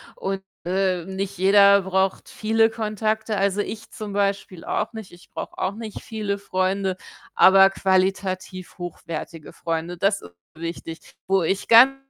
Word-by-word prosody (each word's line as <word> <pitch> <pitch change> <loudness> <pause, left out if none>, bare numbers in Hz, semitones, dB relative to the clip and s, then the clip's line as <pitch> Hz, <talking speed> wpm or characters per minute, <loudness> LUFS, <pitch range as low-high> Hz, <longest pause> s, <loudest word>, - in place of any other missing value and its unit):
und, 195 0 -4 0.2
äh, 185 -2 0
nicht 190 +1 -4
jeder 200 +1 +6
braucht 190 0 -1
viele 225 +1 +2
Kontakte. 215 -1 -2
Also, 200 +1 +1
ich 215 +1 -7
zum 210 -2 -7
Beispiel 200 -3 -1
auch - - -2
nicht. 220 -3 -8
Ich 175 0 -17
brauche - - -7
auch 190 - -1
nicht 220 -1 -7
viele 210 -3 -3
Freunde, 190 -1 -1 0.4
aber 195 0 +7
qualitativ 190 -1 -1
hochwertige 170 -2 -7
Freunde. 165 +1 -4
Das 195 +3 +1
ist 85 - -12 0.2
wichtig, 165 0 -7
wo 195 -1 +3
ich 190 +4 -1
ganz 255 +4 +8
195 Hz, 145 wpm, -23 LUFS, 185-205 Hz, 0.4 s, ganz